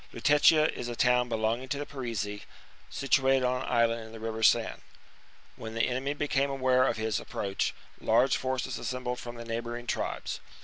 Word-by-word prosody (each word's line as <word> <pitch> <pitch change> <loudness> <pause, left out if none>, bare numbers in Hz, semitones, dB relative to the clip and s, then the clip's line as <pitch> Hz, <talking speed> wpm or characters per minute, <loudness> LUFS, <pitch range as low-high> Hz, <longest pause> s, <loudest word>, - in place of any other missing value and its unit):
Lutetia 150 +5 +5
is 120 - -5
a 120 - -4
town 125 0 +3
belonging 115 +3 -1
to 145 +1 -2
[Paris.] 120 -8 -3
the 105 0 -6
Parisii, - - -13 0.5
situated 135 -1 +2
on 125 0 +1
an - - -5
island 115 -1 +2
in 110 - -11
the 115 - -9
river 110 0 -4
Seine. - - +3 0.8
When 110 0 -7
the 115 - +2
enemy 130 +3 -2
became 140 -1 0
aware 130 -1 +3
of - - 0
his 110 -2 -1
approach, 100 -1 -2 0.2
large 130 +2 +3
forces 130 -1 -2
assembled 125 -1 -3
from 120 0 -7
the 115 0 -8
neigh 115 0 -2
bouring 120 0 -6
tribes. - - -3
125 Hz, 185 wpm, -29 LUFS, 115-130 Hz, 0.8 s, Lutetia